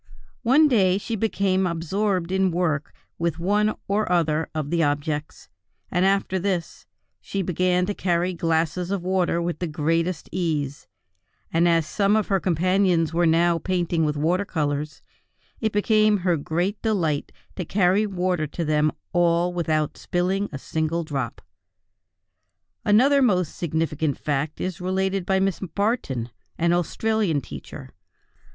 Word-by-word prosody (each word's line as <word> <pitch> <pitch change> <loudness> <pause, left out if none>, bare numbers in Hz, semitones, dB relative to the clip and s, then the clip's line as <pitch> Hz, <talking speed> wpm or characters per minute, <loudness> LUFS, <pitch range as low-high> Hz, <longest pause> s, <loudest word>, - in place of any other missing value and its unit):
One 275 +6 +5
day 195 -8 +3
she 225 +3 -3
became 195 -3 +1
absorbed 180 +2 -1
in 190 0 +2
work 165 -4 -1 0.3
with 170 -2 -1
one 210 +5 +1
or 205 -1 0
other 160 -2 +1
of 150 -1 -3
the 170 -1 +2
objects, 150 0 -2 0.4
and 180 - +2
after 195 -1 +1
this, 180 -3 -3 0.3
she 195 -1 -3
began 180 +1 +1
to 205 - -2
carry 180 -1 0
glasses 165 +1 0
of 195 -3 -2
water 180 -2 +1
with 170 -2 -2
the 175 - -2
greatest 165 +3 -1
ease; 155 -6 -2 0.7
and 170 +1 +4
as 165 -2 +3
some 200 +5 +1
of 215 -2 0
her 195 -1 +2
companions 180 -1 +2
were 170 0 +3
now 170 +1 +3
painting 175 -1 0
with 150 -1 0
water 175 +6 +1
colors, 150 -4 -3 0.6
it 220 -1 0
became 215 0 +3
her 175 -2 +3
great 175 +7 -2
delight 170 -10 0 0.2
to 185 - -3
carry 195 +4 +2
water 180 -4 -1
to 165 +3 -4
them 150 0 +2 0.2
all 175 0 +2
without 155 -3 -1
spilling 190 +3 -1
a 140 - -5
single 160 +4 -2
drop. 135 -6 -4 1.4
Another 265 +7 +4
most 180 - +2
significant 160 -2 -1
fact 150 +1 -2
is 185 -1 -4
related 190 0 -1
by 190 0 +2
Miss 195 -2 0
Barton, 185 - -2 0.3
an 170 +1 +2
Australian 185 0 0
teacher. 75 - -9
175 Hz, 145 wpm, -24 LUFS, 160-195 Hz, 1.4 s, One